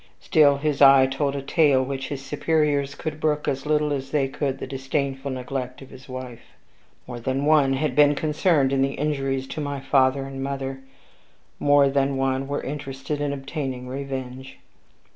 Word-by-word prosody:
Still 145 -2 +4
his 145 0 -2
eye 135 -1 +8
told 140 +1 -1
a 140 - -4
tale 140 -3 +3
which 135 0 -4
his 135 -1 -6
superiors 145 -1 0
could 155 0 -5
brook 150 -1 0
as 135 +2 -2
little 150 -1 +1
as 135 -1 -4
they 140 -2 +1
could 135 0 -3
the - - -6
disdainful 135 +1 -3
neglect 130 0 -5
of 135 - -15
his 130 +1 -14
wife. 130 -2 -9 0.5
More 120 -1 -7
than 130 +4 -2
one 145 -3 +4
had 135 -1 -1
been 145 0 +5
concerned 150 -2 +1
in 135 - +2
the 135 0 0
injuries 135 -2 -1
to 155 - -4
my 145 -1 -3
father 135 0 +2
and 135 0 -7
mother; 135 -1 -4 0.8
more 145 -1 +5
than 135 0 +1
one 135 0 0
were 145 +1 -3
interested 140 +1 -5
in 145 -1 -1
obtaining 135 -2 -5
revenge. 130 -1 -6
135 Hz, 175 wpm, -24 LUFS, 135-145 Hz, 0.8 s, eye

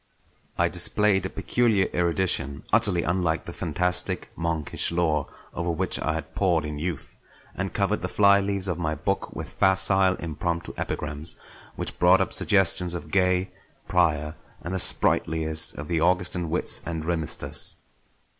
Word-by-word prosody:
I - - +3
displayed 100 -3 +2
a - - -11
peculiar 110 -6 +1
erudition 85 -5 0
utterly 100 -7 +4
unlike 85 -2 -1
the 85 - -8
fantastic, 90 +2 -1
monkish 85 -2 -1
lore 80 -4 0 0.3
over 85 0 -3
which 90 +3 +1
I 80 - -1
had 80 - -6
pored 85 -5 +1
in 75 -1 -6
youth; 80 -3 -5 0.4
and 100 0 -4
covered 100 +1 -1
the 90 - -2
flyleaves 100 -1 +2
of 90 -2 -3
my 80 -2 -2
books - - -2
with - - -8
facile 95 0 +3
impromptu 85 +1 -4
epigrams 75 +3 -3 0.4
which - - -5
brought - - +5
up - - -1
suggestions 90 -3 +3
of 75 -3 -8
Gay, 90 0 +1 0.4
Prior, 80 -4 +1 0.3
and 85 - -5
the 95 - -1
sprightliest 80 -2 +3
of 75 - -7
the 85 -2 0
Augustan 90 -1 +1
wits 85 - 0
and 80 -2 -5
rimesters. 80 -2 0
85 Hz, 145 wpm, -25 LUFS, 80-95 Hz, 0.4 s, brought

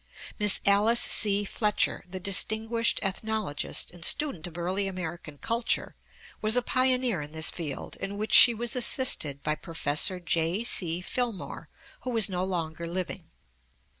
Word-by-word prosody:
Miss 210 -1 +5
Alice 210 +4 +4
C. 205 -1 +2
Fletcher, 210 +1 0
the 185 +1 -6
distinguished 220 +4 0
ethnologist 200 -5 -1
and 175 -1 -11
student 275 - 0
of 170 -1 -12
early 185 +3 -2
American 170 -5 -7
culture, 230 - -2 0.5
was 215 +1 +1
a 245 - +1
pioneer 255 -7 +1
in 150 +1 -10
this 160 0 +1
field, 155 -6 -6
in 200 +1 -6
which 215 +1 -4
she 240 -2 +8
was 235 +1 -1
assisted 235 - +2
by 150 - 0
Prof. 155 -2 0 0.2
J. 170 +6 0
C. 175 -7 +2
Filmore, 235 -1 -4 0.3
who 250 -2 -4
is 215 -2 +5
no 180 -1 -3
longer 170 -3 -4
living. 180 0 -6
195 Hz, 145 wpm, -27 LUFS, 170-225 Hz, 0.5 s, she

